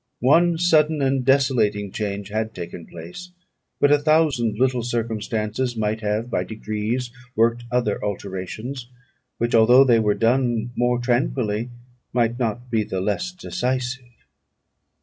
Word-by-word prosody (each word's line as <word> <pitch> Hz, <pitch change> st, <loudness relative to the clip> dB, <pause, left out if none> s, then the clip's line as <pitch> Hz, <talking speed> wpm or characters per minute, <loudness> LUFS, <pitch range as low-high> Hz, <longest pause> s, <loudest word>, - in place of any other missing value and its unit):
One 165 Hz, +7 st, +4 dB
sudden 160 Hz, -3 st, +3 dB
and 135 Hz, -1 st, +1 dB
desolating 120 Hz, -7 st, +2 dB
change 100 Hz, -1 st, -4 dB
had 110 Hz, +1 st, -3 dB
taken 85 Hz, -1 st, -7 dB
place; 85 Hz, -, -10 dB, 0.5 s
but 145 Hz, -, +4 dB
a 145 Hz, -, +5 dB
thousand 145 Hz, -8 st, +2 dB
little 125 Hz, 0 st, +1 dB
circumstances 115 Hz, 0 st, -2 dB
might 110 Hz, 0 st, -1 dB
have 105 Hz, +2 st, -1 dB
by 125 Hz, -, -1 dB
degrees 110 Hz, +3 st, -3 dB, 0.2 s
worked 115 Hz, +2 st, +2 dB
other 120 Hz, -4 st, 0 dB
alterations, 105 Hz, +6 st, -5 dB, 0.5 s
which, 120 Hz, +1 st, -1 dB
although 120 Hz, +4 st, +7 dB
they 120 Hz, -4 st, +4 dB
were 105 Hz, -2 st, +2 dB
done 120 Hz, -1 st, +1 dB
more 120 Hz, 0 st, +1 dB
tranquilly, 120 Hz, -2 st, 0 dB, 0.4 s
might 120 Hz, 0 st, +1 dB
not 120 Hz, +1 st, -3 dB
be 110 Hz, -2 st, +2 dB
the 95 Hz, -2 st, -4 dB
less 105 Hz, -, -1 dB
decisive. 130 Hz, -7 st, -3 dB
120 Hz, 130 wpm, -22 LUFS, 110-130 Hz, 0.5 s, although